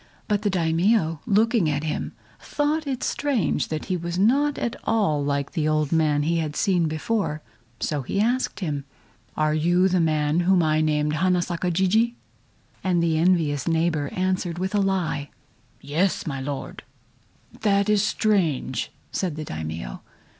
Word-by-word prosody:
But 210 -2 +1
the 210 - +1
Daimio 165 -1 +1
looking 215 -4 +3
at 145 0 -1
him, 155 -1 -3 0.3
thought 300 +1 -1
it 260 -2 -2
strange 265 - 0
that 155 -1 -4
he 185 - -1
was 170 0 -4
not 280 +9 +3
at 235 - -2
all 195 -10 +1
like 140 0 -1
the 155 -3 -1
old 155 -2 +1
man 155 -3 +2
he 165 +2 +1
had 155 -2 -3
seen 180 -6 +2
before, 155 0 -2 0.4
so 150 -3 -1
he 135 - -2
asked 235 -2 0
him: 145 -5 -2 0.5
"Are 155 0 +2
you 175 +4 +3
the 185 -1 +2
man 155 -1 +1
whom 180 0 +3
I 155 0 +2
named 150 -1 +1
Hana 180 +2 +2
Saka 175 +1 -2
Jijii?" 200 +7 +2 0.7
And 175 -2 +2
the 160 -2 +1
envious 160 -5 +2
neighbor 160 -3 +1
answered 185 -2 -1
with 190 +2 -2
a 205 - +2
lie: 180 -7 -1 0.5
"Yes, 160 +7 0
my 135 -5 -3
Lord!" 140 0 -5 0.8
"That 200 -2 +2
is 210 -1 +3
strange!" 185 - 0 0.2
said 180 -6 -2
the 155 0 -5
Daimio. 80 - -6
170 Hz, 160 wpm, -24 LUFS, 155-195 Hz, 0.8 s, looking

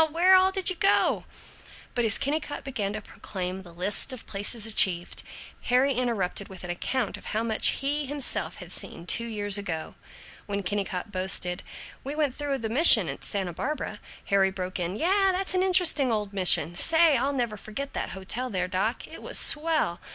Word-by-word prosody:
Where 345 +4 +4
all 375 0 +4
did 385 -1 -3
you - - -4
go?" 390 - +2 0.7
But 240 - 0
as 225 - +4
Kennicott 290 +1 -3
began 210 -7 -3
to 215 - -5
proclaim 185 -2 -6
the 175 -2 -13
list 185 +8 -1
of 255 -3 -8
places 210 +2 -2
achieved, 190 -5 +3 0.4
Harry 255 +3 +3
interrupted 225 -6 -1
with 190 -1 -12
an 175 - -4
account 225 +5 -3
of - - -15
how 220 +2 -2
much 220 -2 +3 0.2
he 290 +1 0
himself 285 -1 -2
had - - -10
seen, 170 - -6
two 235 +5 0
years 205 -2 0
ago. 165 -6 -5 0.5
When 200 -1 -3
Kennicott 195 +1 -3
boasted, 185 -2 +2 0.4
"We 280 +2 -5
went 295 -4 0
through 285 -2 -2
the 225 - -4
mission 270 +10 +6
at - - -6
Santa 190 -4 -2
Barbara," 295 - -4 0.3
Harry 195 -1 +2
broke 185 -1 -5
in, 175 +2 -3
"Yeh, 385 - +2
that's 375 +1 0
an 370 - +2
interesting 355 -8 +3
old 210 -2 -2
mission. 175 -4 +4
Say, 320 - +4
I'll 270 +3 0
never 240 -6 -2
forget 220 +7 -7
that - - -3
hotel 235 +7 -3
there, 185 -4 -2
doc. 190 +6 -2
It - - -11
was - - -2
swell. 310 - +2
220 Hz, 185 wpm, -26 LUFS, 190-285 Hz, 0.7 s, mission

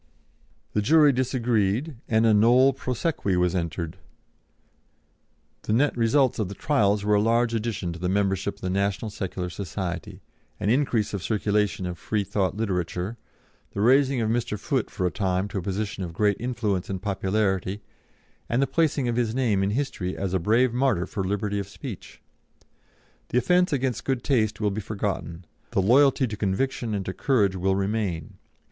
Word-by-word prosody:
The 105 - +1
jury 150 +6 +5
disagreed, 125 +1 0
and 110 0 +3
a 110 - +5
nolle 125 +6 +5
prosequi 125 - -1
was 90 0 +2
entered. 85 -1 -3 1.6
The 105 - -2
net 140 +5 +2
results 120 +2 +2
of 105 -4 -1
the 100 - -7
trials 105 -5 +1
were 105 - +3
a 105 - +4
large 115 +2 +2
addition 105 -6 -2
to 85 - -9
the 90 +1 -1
membership 100 0 0
of - - -23
the 90 - -2
National 100 +2 -1
Secular 90 -2 -4
Society, 90 -2 -5 0.4
an 105 - +1
increase 120 -6 +1
of 100 - -3
circulation 105 -2 0
of 90 -2 -5
Freethought 100 -2 -1
literature, 95 0 -2 0.6
the 100 - -1
raising 130 +2 +4
of 110 -1 0
Mr. 120 -2 -1
Foote 130 +4 -1
for 90 - -3
a 90 - +1
time 95 -1 0
to 100 - -3
a - - -4
position 100 +2 -3
of 85 -2 -6
great 105 +2 +2
influence 110 -6 -2
and 95 -1 -3
popularity, 95 0 -1 0.7
and 120 - +1
the 140 - +4
placing 140 -1 +1
of 120 -1 -1
his 115 -2 0
name 115 -7 +1
in 95 - +1
history 105 -6 -2
as 95 -2 -2
a 95 - +2
brave 115 +7 +2
martyr 125 -8 +1
for 95 - -4
liberty 100 +1 -1
of 100 - -5
speech. 100 +2 -9 1.1
The - - 0
offence 180 +7 +3
against 130 -4 -1
good 130 -2 -1
taste 110 -6 +1
will 105 -2 +1
be 105 +2 -3
forgotten; 95 -5 -4 0.2
the - - 0
loyalty 135 +7 +4
to 110 -3 -4
conviction 110 +3 -1
and 95 -2 -3
to 95 - -3
courage 105 -9 +2
will 95 +1 +1
remain. 100 -5 -2
105 Hz, 175 wpm, -25 LUFS, 95-120 Hz, 1.6 s, jury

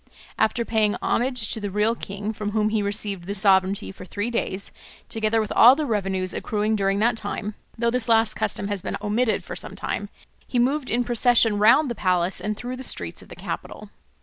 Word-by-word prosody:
After 235 +2 +1
paying 215 -2 +1
homage 250 -3 0
to - - 0
the 205 -1 -3
real 210 +3 +1
king, 205 -1 -5
from 210 -1 -4
whom 215 -1 +2
he 215 -1 0
received 200 -3 -3
the 200 - -2
sovereignty 195 0 +3
for 190 - -11
three 205 +5 -4
days, 200 -4 -2 0.4
together 225 0 +1
with 215 -2 -2
all 245 +3 +8
the 305 +1 -2
revenues 195 -5 -1
accruing 215 0 -1
during 195 -1 +1
that 230 +3 +2
time 215 -1 -4 0.2
(though 235 0 +1
this 245 -1 -1
last 225 -1 +4
custom 200 - -2
has 205 -2 -3
been - - -4
omitted 215 +3 0
for - - -7
some - - -5
time), - - -4 0.4
he 250 - -2
moved 260 +3 +1
in 240 +2 +1
procession 235 -3 +3
round 230 +8 +5
the 240 - -2
palace 185 -3 0
and 210 0 -3
through 250 +2 -5
the 260 - -7
streets 85 - -4
of - - -16
the - - -10
capital. - - -7
215 Hz, 205 wpm, -24 LUFS, 200-235 Hz, 0.4 s, all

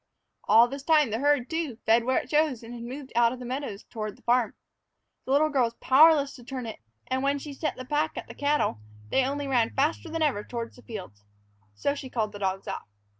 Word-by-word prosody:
All 225 +3 +7
this 275 +3 -6
time 300 -4 +3
the 220 - -1
herd, 285 -2 +2
too, 320 -6 -2
fed 230 +1 +4
where 260 +1 +2
it 250 - -3
chose 295 -6 +2
and 230 +1 -9
had 240 - -7
moved 260 +3 -7
out 235 0 +5
of - - -7
the 250 - -8
meadows 255 -5 -4
toward 215 -3 -6
the - - -24
farm. 240 -1 +2 0.7
The - - -3
little 300 +3 +4
girl 265 -4 +3
was 230 0 -5
powerless 285 +2 +5
to 245 - -13
turn 255 0 -5
it, 225 - -7 0.3
and 260 0 -1
when 280 +1 +1
she 285 +1 -7
set 305 +3 -2
the 255 - -8
pack 300 +3 -1
at - - -5
the - - -9
cattle 290 - 0 0.3
they 265 - +3
only 280 +2 -2
ran 240 -4 +1
faster 305 +4 0
than 325 0 -1
ever 260 -9 +1
toward 235 0 -5
the 245 - -16
fields. 185 - -9 0.5
So 280 - 0
she 275 -2 -7
called 220 -4 -1
the 205 - -9
dogs 195 -1 -2
off. - - -5
260 Hz, 235 wpm, -27 LUFS, 230-285 Hz, 0.7 s, All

